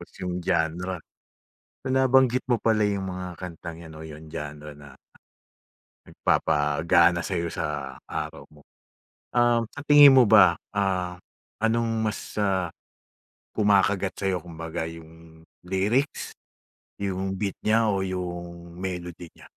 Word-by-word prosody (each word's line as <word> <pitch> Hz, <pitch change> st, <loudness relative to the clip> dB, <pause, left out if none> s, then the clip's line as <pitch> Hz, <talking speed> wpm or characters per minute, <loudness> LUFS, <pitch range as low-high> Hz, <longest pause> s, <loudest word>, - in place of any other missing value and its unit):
Tas -, -, -13 dB
yung 90 Hz, -1 st, -4 dB
genre. 85 Hz, +3 st, -1 dB, 0.9 s
Binabanggit 130 Hz, -1 st, +3 dB
mo 120 Hz, -, +3 dB
pala 110 Hz, -1 st, +1 dB
yung 100 Hz, -2 st, -1 dB
mga 90 Hz, -2 st, -6 dB
kantang 85 Hz, -2 st, -8 dB
'yan 80 Hz, -2 st, -11 dB
'no 80 Hz, -, -10 dB
yung 80 Hz, 0 st, -10 dB
genre 75 Hz, -1 st, -7 dB
na, 70 Hz, -2 st, -15 dB, 1.1 s
nagpapagana 80 Hz, +3 st, +2 dB
sa'yo 85 Hz, -1 st, -2 dB
sa 75 Hz, -4 st, -4 dB
araw -, -, -5 dB
mo. 75 Hz, -1 st, -19 dB, 0.7 s
Um, 120 Hz, -1 st, +3 dB
sa -, -, -7 dB
tingin 145 Hz, -2 st, +8 dB
mo 130 Hz, -, +8 dB
ba, 95 Hz, -5 st, +7 dB, 0.2 s
ah, 90 Hz, -3 st, -1 dB, 0.4 s
anong 115 Hz, +1 st, +1 dB, 0.2 s
mas, 105 Hz, -, -5 dB
ah, 95 Hz, -4 st, +1 dB, 0.8 s
kumakagat 100 Hz, -2 st, +2 dB
sa'yo 95 Hz, -3 st, -1 dB
kumbaga 80 Hz, -1 st, -5 dB
yung 80 Hz, 0 st, -14 dB, 0.2 s
lyrics, 100 Hz, +10 st, -1 dB, 0.7 s
yung 95 Hz, -1 st, -2 dB
beat 100 Hz, -3 st, -2 dB
niya, 110 Hz, +1 st, +3 dB
o 95 Hz, -2 st, 0 dB
yung 85 Hz, -2 st, -6 dB
melody 90 Hz, -2 st, -6 dB
niya? -, -, -17 dB
90 Hz, 125 wpm, -25 LUFS, 80-105 Hz, 1.1 s, tingin